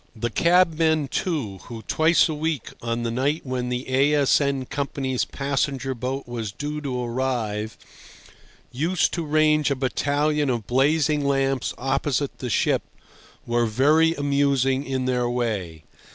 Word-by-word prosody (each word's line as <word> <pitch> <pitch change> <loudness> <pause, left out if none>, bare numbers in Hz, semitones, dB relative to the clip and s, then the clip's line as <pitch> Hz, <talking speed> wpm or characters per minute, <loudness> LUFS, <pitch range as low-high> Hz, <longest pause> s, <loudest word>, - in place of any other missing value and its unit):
The 115 +1 -3
cabmen, 160 -2 +3
too, 130 - -2
who 115 -2 -8
twice 160 +3 +3
a 160 - -3
week, 155 -4 -3
on 115 0 -2
the 115 - -1
night 140 +6 0
when 125 -1 -2
the 125 +1 -3
A.S.N. 140 0 +2
Company's 135 -2 -2
passenger 135 -1 -2
boat 130 +2 -4
was 115 -4 -4
due 150 +6 -5
to 125 -4 -3
arrive, 115 -4 -2 0.9
used 165 +7 0
to 170 - -2
range 155 0 +3
a 140 - +1
battalion 145 +3 0
of 120 -4 -1
blazing 145 +4 +2
lamps 135 -2 0
opposite 135 +1 -1
the 125 - -4
ship, - - +2 0.6
were 120 0 +1
very 155 +8 +3
amusing 140 -1 +1
in 130 -1 -1
their 125 -1 0
way. 100 -10 -3
135 Hz, 140 wpm, -24 LUFS, 125-150 Hz, 0.9 s, cabmen